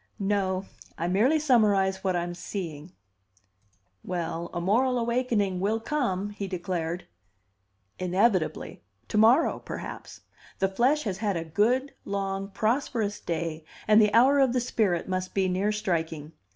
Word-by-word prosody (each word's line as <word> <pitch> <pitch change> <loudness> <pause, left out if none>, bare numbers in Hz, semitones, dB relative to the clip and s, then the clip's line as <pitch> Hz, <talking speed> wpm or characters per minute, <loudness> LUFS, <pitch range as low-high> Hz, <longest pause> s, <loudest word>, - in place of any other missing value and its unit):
"No. 195 -2 0 0.3
I 170 - -2
merely 220 - +3
summarize 205 -9 +2
what 190 -2 +1
I'm 175 0 -2
seeing." 175 -3 -6 1.1
"Well, 170 -1 -3
a - - -3
moral 245 +8 +2
awakening 235 -5 0
will 210 +4 0
come," 220 -7 -1
he 205 -1 -5
declared. 175 -2 -3 0.9
"Inevitably. 185 -1 0 0.3
To - - -1
morrow, 240 +9 +4
perhaps. - - -8 0.4
The 195 - +1
flesh 255 +10 +2
has 190 -4 -3
had 205 -5 0
a 165 - -4
good, 240 - +1
long, 195 -1 -3
prosperous 220 -1 -1
day, 165 -1 -3 0.2
and 215 +1 +7
the 210 -1 +4
hour 265 +6 +5
of 265 -3 +3
the 255 - +2
spirit 215 -7 0
must 185 0 -3
be 190 -1 +2
near 190 +3 0
striking. 165 -7 -2
195 Hz, 140 wpm, -27 LUFS, 180-230 Hz, 1.1 s, and